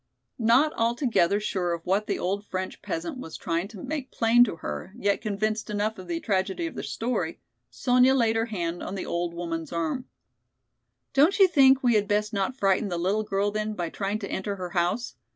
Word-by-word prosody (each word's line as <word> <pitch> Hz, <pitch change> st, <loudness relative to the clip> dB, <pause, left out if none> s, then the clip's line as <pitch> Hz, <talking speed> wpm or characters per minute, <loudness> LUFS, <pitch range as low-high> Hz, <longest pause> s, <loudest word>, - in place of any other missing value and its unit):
Not 245 Hz, +7 st, +4 dB
altogether 230 Hz, -, +2 dB
sure 185 Hz, -4 st, -1 dB
of 165 Hz, -1 st, -6 dB
what 200 Hz, +3 st, +1 dB
the -, -, 0 dB
old 200 Hz, +3 st, -2 dB
French 185 Hz, -2 st, -5 dB
peasant 330 Hz, -4 st, -4 dB
was 160 Hz, -10 st, -7 dB
trying 170 Hz, +2 st, -2 dB
to 200 Hz, -3 st, -10 dB
make 275 Hz, -2 st, -4 dB
plain 235 Hz, +1 st, +5 dB
to 210 Hz, -, -4 dB
her, 180 Hz, +4 st, -6 dB
yet 200 Hz, -4 st, +1 dB
convinced 215 Hz, 0 st, -2 dB
enough 210 Hz, 0 st, -1 dB
of 185 Hz, -, -9 dB
the 170 Hz, -1 st, -2 dB
tragedy 190 Hz, -, -1 dB
of 330 Hz, -, -4 dB
the -, -, -5 dB
story, 220 Hz, -9 st, -2 dB, 0.3 s
Sonya 250 Hz, -, +3 dB
laid 230 Hz, -3 st, +2 dB
her 225 Hz, +1 st, +1 dB
hand 175 Hz, -5 st, -3 dB
on 190 Hz, -, -5 dB
the 190 Hz, -, -4 dB
old 170 Hz, 0 st, -2 dB
woman's 165 Hz, -2 st, -4 dB
arm. 170 Hz, +9 st, -2 dB, 1.1 s
"Don't 300 Hz, +8 st, +4 dB
you 390 Hz, -2 st, +7 dB
think 270 Hz, -5 st, +5 dB
we 245 Hz, -1 st, +4 dB
had 210 Hz, -1 st, +2 dB
best 210 Hz, +1 st, 0 dB
not 200 Hz, +6 st, -1 dB
frighten 195 Hz, -1 st, +2 dB
the 175 Hz, -, -2 dB
little 190 Hz, +5 st, +1 dB
girl 205 Hz, -1 st, 0 dB
then 215 Hz, 0 st, -2 dB
by 175 Hz, -3 st, -3 dB
trying 200 Hz, +1 st, -2 dB
to 205 Hz, -2 st, -6 dB
enter 200 Hz, +1 st, -2 dB
her 180 Hz, -2 st, -6 dB
house. 175 Hz, +7 st, -1 dB
205 Hz, 205 wpm, -26 LUFS, 180-235 Hz, 1.1 s, you